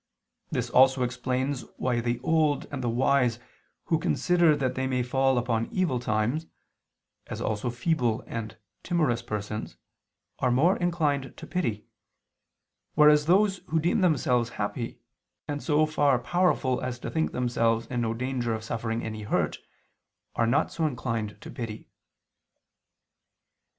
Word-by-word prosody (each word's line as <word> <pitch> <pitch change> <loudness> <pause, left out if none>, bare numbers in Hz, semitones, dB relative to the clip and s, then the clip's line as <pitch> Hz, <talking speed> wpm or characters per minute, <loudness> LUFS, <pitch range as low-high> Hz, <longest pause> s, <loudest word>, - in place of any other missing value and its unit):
This - - -2
also 130 0 +5
explains 125 +2 -1 0.2
why 125 -2 0
the 120 0 -1
old 155 -3 +2
and 135 -3 -4
the 120 - 0
wise 125 0 +2 0.5
who 160 - +1
consider 175 -1 +3
that 130 -3 -1
they 130 +1 -1
may 125 -1 0
fall 135 +1 +2
upon 115 -2 0
evil 175 -10 0
times, 120 +7 -1 0.8
as - - -6
also 110 +3 -1
feeble 120 -2 0
and 110 -1 -6 0.2
timorous 155 -10 +1
persons, 105 -1 -5 0.6
are 125 - +2
more 150 +10 +4
inclined 155 -6 -1
to 165 - -8
pity: 120 - -2 1.1
whereas 150 0 +6
those 195 +2 +4
who 160 - +1
deem 175 +6 +1
themselves 125 -9 +2
happy, 110 +3 -3 0.5
and 145 -1 -3
so 155 0 +3
far 145 -3 +2
powerful 130 -2 +1
as 125 -1 -3
to - - -6
think 160 0 0
themselves 115 -2 +1
in 125 -1 -2
no 115 -1 -1
danger 125 -2 -1
of 110 - -7
suffering 115 0 -3
any 110 -1 -5
hurt, 105 - -1 0.8
are 115 - +2
not 130 +5 +2
so 160 -2 0
inclined 115 -6 -3
to - - -9
pity. 110 -3 -6
125 Hz, 140 wpm, -27 LUFS, 115-150 Hz, 1.1 s, whereas